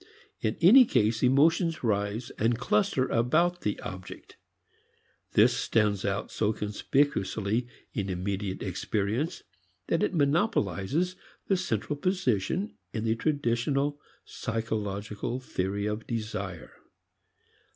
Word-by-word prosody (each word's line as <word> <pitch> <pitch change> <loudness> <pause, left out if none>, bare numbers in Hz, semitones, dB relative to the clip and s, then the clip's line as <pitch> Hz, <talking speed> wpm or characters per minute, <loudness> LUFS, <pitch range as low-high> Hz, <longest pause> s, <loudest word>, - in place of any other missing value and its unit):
In 110 - -1
any 235 +10 +9
case, 110 - +1
emotions 160 +6 +3
rise 105 +1 -1
and 115 +2 +2
cluster 200 - +1
about 165 +10 +2
the 105 - -2
object. 95 -2 -9 1.0
This - - +5
stands 105 -3 +1
out 100 -1 -2
so 110 0 +1
conspicuously 110 0 0 0.3
in 100 -3 -2
immediate 95 +1 -3
experience 105 - -2 0.5
that 165 - +2
it - - 0
monopolizes 150 - +1 0.3
the 195 - +2
central 145 - -2
position 180 - 0 0.2
in 110 - -3
the 110 -1 +2
traditional 140 +2 0 0.3
psychological 110 0 -3
theory 100 -4 -2
of 105 +1 -3
desire. 105 -6 -4
115 Hz, 105 wpm, -28 LUFS, 100-145 Hz, 1.0 s, any